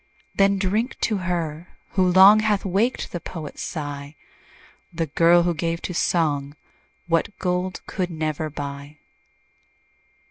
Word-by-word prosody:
Then 195 Hz, 0 st, +3 dB
drink 210 Hz, +6 st, -1 dB
to 215 Hz, -, +1 dB
her, 175 Hz, -3 st, -4 dB
who 190 Hz, -, +1 dB
long 190 Hz, +4 st, +7 dB
Hath 210 Hz, -2 st, 0 dB
waked 200 Hz, +7 st, 0 dB
the 175 Hz, -, -4 dB
poet's 160 Hz, -3 st, -8 dB
sigh, 145 Hz, -1 st, -6 dB, 0.8 s
The 165 Hz, -1 st, -2 dB
girl, 170 Hz, +3 st, +4 dB
who 175 Hz, 0 st, +1 dB
gave 165 Hz, +1 st, -2 dB
to 180 Hz, -, -4 dB
song 150 Hz, -5 st, 0 dB, 0.5 s
What 170 Hz, +4 st, 0 dB
gold 180 Hz, 0 st, -2 dB
could 185 Hz, -3 st, -3 dB
never 155 Hz, -1 st, -3 dB
buy. 140 Hz, 0 st, -7 dB
175 Hz, 130 wpm, -23 LUFS, 155-190 Hz, 0.8 s, long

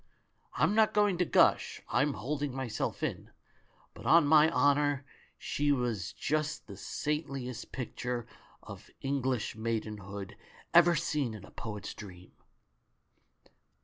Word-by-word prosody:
I'm 155 Hz, +7 st, +3 dB
not 220 Hz, -1 st, +3 dB
going 205 Hz, -4 st, +3 dB
to 180 Hz, -, +3 dB
gush -, -, +3 dB
— -, -, -28 dB
I'm 140 Hz, +3 st, +2 dB
holding 140 Hz, +5 st, -3 dB
myself 130 Hz, -4 st, -3 dB
in -, -, -3 dB, 0.3 s
— -, -, -34 dB
but -, -, -9 dB
on 165 Hz, -1 st, +7 dB
my 155 Hz, +1 st, +6 dB
honour 145 Hz, -1 st, +2 dB, 0.3 s
she 145 Hz, 0 st, 0 dB
was 120 Hz, -9 st, -1 dB
just 155 Hz, 0 st, -2 dB
the 100 Hz, -, -10 dB
saintliest 135 Hz, +1 st, -4 dB
picture 125 Hz, -1 st, -4 dB, 0.4 s
of -, -, -11 dB
English 130 Hz, -5 st, -1 dB
maidenhood 105 Hz, -3 st, -4 dB, 0.4 s
ever 170 Hz, 0 st, +7 dB
seen 150 Hz, -7 st, -1 dB
in 100 Hz, -2 st, -10 dB
a -, -, -16 dB
poet's 105 Hz, -3 st, -6 dB
dream 90 Hz, -3 st, -11 dB
135 Hz, 130 wpm, -31 LUFS, 110-150 Hz, 0.4 s, on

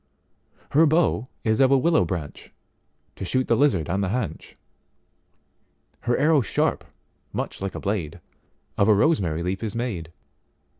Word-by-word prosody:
Her 160 Hz, +3 st, +5 dB
bow 155 Hz, -6 st, +2 dB, 0.2 s
is 110 Hz, -1 st, +1 dB
of 130 Hz, -, +5 dB
a 135 Hz, -, +5 dB
willow 145 Hz, -, +3 dB
branch, 80 Hz, -5 st, -6 dB, 0.7 s
To -, -, -6 dB
shoot 130 Hz, +7 st, 0 dB
the 115 Hz, -, +3 dB
lizard 120 Hz, -, +2 dB
on 95 Hz, +3 st, -1 dB
the 95 Hz, -, -1 dB
haunch:Her 75 Hz, -, -8 dB
arrow 155 Hz, -1 st, +4 dB
sharp, -, -, -1 dB, 0.5 s
much -, -, -4 dB
like 95 Hz, 0 st, -4 dB
a -, -, -4 dB
blade, 90 Hz, -5 st, -3 dB, 0.6 s
Of 100 Hz, -, +4 dB
a 110 Hz, -, +6 dB
rosemary 95 Hz, -, +1 dB
leaf 95 Hz, +2 st, -2 dB
is 110 Hz, -1 st, -4 dB
made. 100 Hz, -9 st, -4 dB
105 Hz, 145 wpm, -24 LUFS, 85-130 Hz, 0.7 s, a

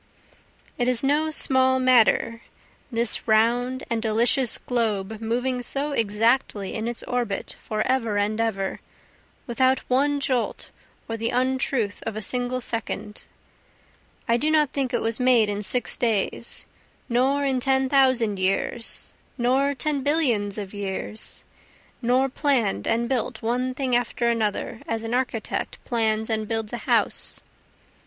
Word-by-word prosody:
It 245 Hz, -, +1 dB
is 250 Hz, 0 st, +2 dB
no 295 Hz, +3 st, +2 dB
small 260 Hz, -3 st, +3 dB
matter, 230 Hz, -2 st, +3 dB, 0.5 s
this 230 Hz, -1 st, 0 dB
round 240 Hz, +4 st, +2 dB
and 230 Hz, -1 st, -1 dB
delicious 235 Hz, +3 st, +2 dB
globe 220 Hz, -4 st, -2 dB
moving 245 Hz, +3 st, -1 dB
so 280 Hz, +4 st, 0 dB
exactly 225 Hz, -3 st, +1 dB
in 220 Hz, +1 st, -3 dB
its 240 Hz, 0 st, -4 dB
orbit 240 Hz, -5 st, -2 dB
for 215 Hz, 0 st, -2 dB
ever 230 Hz, -5 st, 0 dB
and 210 Hz, +2 st, 0 dB
ever, 195 Hz, -4 st, -2 dB, 0.7 s
without 260 Hz, +2 st, +1 dB
one 285 Hz, +3 st, +2 dB
jolt 260 Hz, -3 st, -2 dB, 0.4 s
or 225 Hz, -, -3 dB
the 230 Hz, +1 st, -1 dB
untruth 255 Hz, -3 st, 0 dB
of 225 Hz, -, -3 dB
a -, -, -3 dB
single 250 Hz, +1 st, -2 dB
second, 225 Hz, -3 st, -4 dB, 1.0 s
I 235 Hz, -, +3 dB
do 300 Hz, +5 st, 0 dB
not 305 Hz, -3 st, +3 dB
think 270 Hz, -3 st, -2 dB
it -, -, 0 dB
was 225 Hz, +1 st, +3 dB
made 250 Hz, -4 st, +4 dB
in 205 Hz, 0 st, -2 dB
six 245 Hz, +5 st, +1 dB
days, 230 Hz, 0 st, -1 dB, 0.4 s
nor 265 Hz, +4 st, +1 dB
in 265 Hz, -2 st, +1 dB
ten 265 Hz, +1 st, +2 dB
thousand 255 Hz, -7 st, +3 dB
years, 195 Hz, +5 st, -1 dB, 0.2 s
nor 270 Hz, +3 st, +1 dB
ten 295 Hz, 0 st, -1 dB
billions 250 Hz, -9 st, +1 dB
of 200 Hz, -2 st, -6 dB
years, 200 Hz, +1 st, -6 dB, 0.6 s
Nor 255 Hz, +2 st, +2 dB
plann'd 260 Hz, -, 0 dB
and 235 Hz, +1 st, +1 dB
built 245 Hz, -3 st, -2 dB
one 250 Hz, +3 st, -1 dB
thing 260 Hz, -2 st, 0 dB
after 240 Hz, 0 st, 0 dB
another 225 Hz, 0 st, -2 dB
as 225 Hz, 0 st, -2 dB
an 225 Hz, +1 st, -4 dB
architect 245 Hz, -3 st, -2 dB
plans 220 Hz, -2 st, 0 dB
and 220 Hz, -2 st, -1 dB
builds 225 Hz, -1 st, -3 dB
a -, -, -1 dB
house. -, -, +4 dB
240 Hz, 140 wpm, -24 LUFS, 220-260 Hz, 1.0 s, made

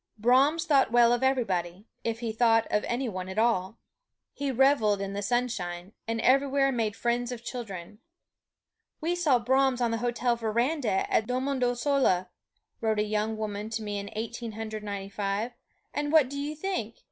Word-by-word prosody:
Brahms 275 Hz, +9 st, +4 dB
thought 275 Hz, -7 st, +3 dB
well 240 Hz, 0 st, +5 dB
of 240 Hz, -, 0 dB
everybody, 195 Hz, -8 st, 0 dB, 0.2 s
if 230 Hz, 0 st, -2 dB
he 230 Hz, -2 st, -2 dB
thought 225 Hz, 0 st, +3 dB
of 210 Hz, -, +2 dB
any 245 Hz, +2 st, -1 dB
one 185 Hz, -3 st, -5 dB
at 190 Hz, -, -7 dB
all. 220 Hz, -2 st, +1 dB, 0.6 s
He 280 Hz, -1 st, -3 dB
reveled 255 Hz, -6 st, +3 dB
in 195 Hz, 0 st, -4 dB
the 200 Hz, -, -3 dB
sunshine, 200 Hz, -6 st, -2 dB, 0.2 s
and 225 Hz, 0 st, -1 dB
everywhere 275 Hz, +1 st, +3 dB
made 225 Hz, -4 st, -1 dB
friends 240 Hz, +1 st, -1 dB
of 240 Hz, -1 st, -6 dB
children. 210 Hz, -6 st, -7 dB, 1.0 s
"We 330 Hz, +3 st, 0 dB
saw 330 Hz, -8 st, +3 dB
Brahms 260 Hz, +1 st, +2 dB
on 240 Hz, -2 st, +1 dB
the 230 Hz, -, -1 dB
hotel 240 Hz, 0 st, 0 dB
veranda 235 Hz, 0 st, 0 dB
at 220 Hz, -, +2 dB
Domodossola," 250 Hz, -6 st, +1 dB, 0.5 s
wrote 220 Hz, -1 st, +1 dB
a 210 Hz, -, +2 dB
young 215 Hz, +1 st, -1 dB
woman 210 Hz, 0 st, -4 dB
to 225 Hz, 0 st, -3 dB
me 205 Hz, -1 st, -3 dB
in 200 Hz, 0 st, -6 dB
Eighteen 230 Hz, +1 st, -5 dB
Hundred 220 Hz, 0 st, -5 dB
Ninety 200 Hz, -1 st, -5 dB
five, 205 Hz, +3 st, -2 dB, 0.4 s
"and 290 Hz, 0 st, -1 dB
what 300 Hz, -5 st, +5 dB
do 280 Hz, -, -4 dB
you 295 Hz, +2 st, -3 dB
think? 310 Hz, -, -3 dB
230 Hz, 170 wpm, -28 LUFS, 210-260 Hz, 1.0 s, well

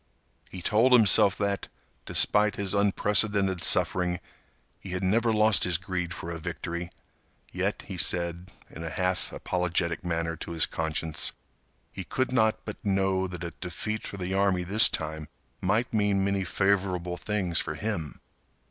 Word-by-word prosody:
He 90 Hz, -2 st, -9 dB
told 115 Hz, +7 st, +3 dB
himself 105 Hz, -4 st, +6 dB
that, 100 Hz, -1 st, -2 dB, 0.4 s
despite 105 Hz, 0 st, +2 dB
his 100 Hz, -2 st, 0 dB
unprecedented 100 Hz, -2 st, +2 dB
suffering, 90 Hz, -1 st, +1 dB, 0.6 s
he 95 Hz, -, -8 dB
had 90 Hz, -, -3 dB
never 115 Hz, +5 st, +2 dB
lost 110 Hz, -1 st, +3 dB
his 90 Hz, -3 st, +2 dB
greed 90 Hz, -2 st, -4 dB
for 85 Hz, -, -6 dB
a 85 Hz, -, -6 dB
victory, 85 Hz, +2 st, -5 dB, 0.6 s
yet, -, -, -2 dB
he -, -, -7 dB
said, 85 Hz, +1 st, 0 dB, 0.2 s
in 80 Hz, -, -8 dB
a 85 Hz, -, -4 dB
half 90 Hz, -1 st, -2 dB
apologetic 90 Hz, -1 st, -2 dB
manner 85 Hz, -1 st, -2 dB
to 85 Hz, -, -6 dB
his 80 Hz, -3 st, +4 dB
conscience, 80 Hz, -1 st, -2 dB, 0.6 s
he 95 Hz, -, -7 dB
could 130 Hz, +7 st, -2 dB
not 110 Hz, -3 st, +1 dB
but -, -, -8 dB
know 95 Hz, -2 st, 0 dB
that 90 Hz, -1 st, -8 dB
a 85 Hz, -, -6 dB
defeat 105 Hz, +5 st, -4 dB
for 100 Hz, -, -7 dB
the 95 Hz, 0 st, -4 dB
army 95 Hz, -2 st, +1 dB
this 100 Hz, +5 st, +8 dB
time 80 Hz, -1 st, -5 dB, 0.3 s
might 105 Hz, +7 st, 0 dB
mean 100 Hz, -2 st, +1 dB
many 100 Hz, -1 st, 0 dB
favorable 95 Hz, -2 st, 0 dB
things 95 Hz, -3 st, 0 dB
for 75 Hz, -, -3 dB
him. 85 Hz, -5 st, -4 dB
95 Hz, 155 wpm, -27 LUFS, 85-100 Hz, 0.6 s, this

